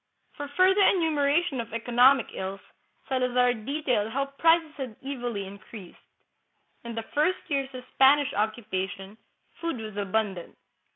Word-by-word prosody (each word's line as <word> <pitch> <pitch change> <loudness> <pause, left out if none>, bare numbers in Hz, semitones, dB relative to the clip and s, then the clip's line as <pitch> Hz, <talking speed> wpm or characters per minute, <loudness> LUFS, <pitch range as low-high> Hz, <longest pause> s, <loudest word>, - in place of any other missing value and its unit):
For 290 -1 -6
further 380 +2 +5
enumera 320 -4 +3
tion 270 -8 -3
of 225 - -10
economic 245 +3 +4
ills, 190 +1 -5 0.5
Salazar 250 -1 +2
details 245 -2 -1
how 275 +3 0
prices 325 -1 +4
had 260 -6 -6
evilly 245 -7 -4
increased. 195 0 -12 0.8
In 235 -1 -7
the 225 - -3
first 315 +5 0
years 275 -2 0
of 250 - -7
Spanish 275 +1 +5
occupation, 200 -2 -3 0.4
food 335 -5 -3
was 215 -2 -7
abundant. 200 -3 -2
250 Hz, 130 wpm, -27 LUFS, 215-285 Hz, 0.8 s, further